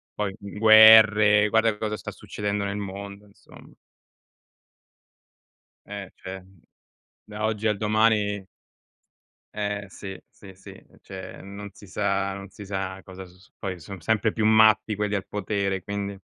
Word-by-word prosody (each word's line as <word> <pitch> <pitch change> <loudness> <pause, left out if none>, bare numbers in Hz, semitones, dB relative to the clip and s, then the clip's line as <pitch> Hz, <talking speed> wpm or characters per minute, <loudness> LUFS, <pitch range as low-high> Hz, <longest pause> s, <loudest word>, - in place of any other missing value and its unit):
poi 105 -2 -2
gu 100 - -9
guerre, 110 -1 +7
guarda 110 -1 +2
cosa 105 0 -3
sta - - -7
succedendo 105 0 -4
nel 100 0 -3
mondo, 100 0 -7
insomma. 100 - -18 2.1
Eh 100 -2 -7
cioè, 95 0 -8
uhm; 95 -2 -23 0.7
da 105 0 -4
oggi 110 0 -1
al 105 -1 0
domani 105 -2 +1 1.1
Eh 105 -1 -3
sì, 95 -1 -8
sì, 95 -2 -15
sì. 95 - -14
Uhm, - - -18
cioè 95 -1 -9
non 100 +1 -9
si 100 - -15
sa 100 0 -1
non 100 0 -9
si 100 +1 -11
sa 95 -1 -4
cosa 95 0 -10
s 90 0 -18
su 95 - -23
poi, 95 -3 -5
son 95 +4 -9
sempre 110 +5 +1
più 110 0 -1
matti 110 0 +4
quelli 105 0 -2
al 100 -1 -4
potere, 100 -2 -2
quindi 100 -1 -5
100 Hz, 150 wpm, -25 LUFS, 95-105 Hz, 2.1 s, guerre